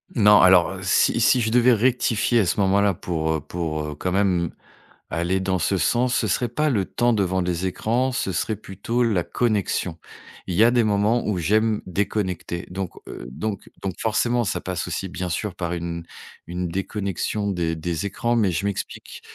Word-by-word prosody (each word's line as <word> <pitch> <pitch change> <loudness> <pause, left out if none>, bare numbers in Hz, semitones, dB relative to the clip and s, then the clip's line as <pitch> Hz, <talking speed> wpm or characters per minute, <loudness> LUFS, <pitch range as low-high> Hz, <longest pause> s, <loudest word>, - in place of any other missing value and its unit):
Non, 105 -3 +6
alors, 95 -1 +6
heu, 95 - -8
si 95 +4 +3
si 125 - +5
je 110 -2 0
devais 125 +1 +5
rectifier 120 0 +2
à 100 - +1
ce 90 - -1
moment-là 100 +1 +3
pour, 80 -2 -2
heu, 80 - -1
pour, 80 -1 -3
heu, 75 -1 -5
quand 90 +4 -3
même 90 -4 +1 0.6
aller 85 +4 0
dans 95 -1 0
ce 95 +4 +1
sens, 120 +8 +1
ce 110 - +1
serait 120 +5 0
pas 150 +5 0
le 100 -5 +1
temps 120 0 +1
devant 95 -3 +1
les 90 +1 -1
écrans, 120 +7 0
ce 95 - -2
serait 110 +5 -1
plutôt 105 +4 -2
la 105 -7 +1
connexion. 95 -4 -1 0.5
Il 90 - -2
y 105 - +5
a 120 - +6
des 120 -2 +3
moments 105 +3 +2
où 105 -4 0
j'aime 110 +5 +1
déconnecter, 95 -2 -2
donc 95 -1 -4 0.2
heu, - - -8
donc 105 +9 -5
donc 95 - -2
forcément, 120 +2 +1
ça 105 - -2
passe 90 0 -4
aussi, 95 +1 -3
bien 90 0 -4
sûr, 95 +3 -2
par 85 0 -3
une 85 0 -4 0.4
une 90 0 -3
déconnexion 100 +2 -2
des 85 -3 -1
des 85 +2 -3
écrans 120 +4 -1
mais 105 -5 +2
je 90 +4 -2
m'explique. 100 -2 -5
95 Hz, 190 wpm, -23 LUFS, 90-110 Hz, 0.6 s, Non